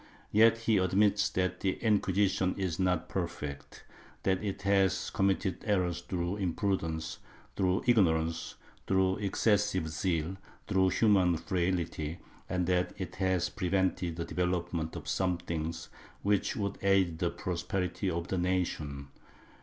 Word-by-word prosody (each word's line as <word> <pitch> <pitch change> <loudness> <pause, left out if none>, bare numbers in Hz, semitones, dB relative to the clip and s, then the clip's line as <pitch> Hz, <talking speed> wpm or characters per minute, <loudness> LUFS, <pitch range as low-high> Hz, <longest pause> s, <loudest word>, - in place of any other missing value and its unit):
Yet 115 +2 +6
he 115 -2 +3
admits 100 +2 +3
that 90 0 -1
the 95 -1 +1
Inquisition 100 -3 +1
is 95 -3 -2
not 90 -2 +1
perfect 75 -6 -5 0.2
— - - -26
that 95 +1 +1
it 95 -2 -4
has 100 -2 +2
com 95 - +2
mitted 95 -2 0
errors 90 -5 0
through 90 +2 -2
imprudence, 85 -4 -2 0.4
through 95 -1 +1
ignorance, 85 -8 +2 0.3
through 95 -1 +2
excessive 100 -3 +1
zeal, 80 -1 0
and 95 +3 -6 0.3
through 95 -2 +3
human 95 -5 +3
frailty, 85 -3 -1 0.3
and 90 -1 0
that 90 0 +1
it 95 -2 -6
has 95 -2 +1
pre 95 -3 -3
vented 95 -3 +1
the 85 0 -3
development 85 -2 -2
of - - -7
some 90 -2 +1
things 80 -1 -4 0.3
which 100 -1 +1
would 100 -2 -3
aid 95 -4 +2
the - - +1
prosperity 90 0 -2
of 85 0 -3
the 95 - 0
nation. 80 -6 -2
90 Hz, 140 wpm, -31 LUFS, 85-95 Hz, 0.4 s, Yet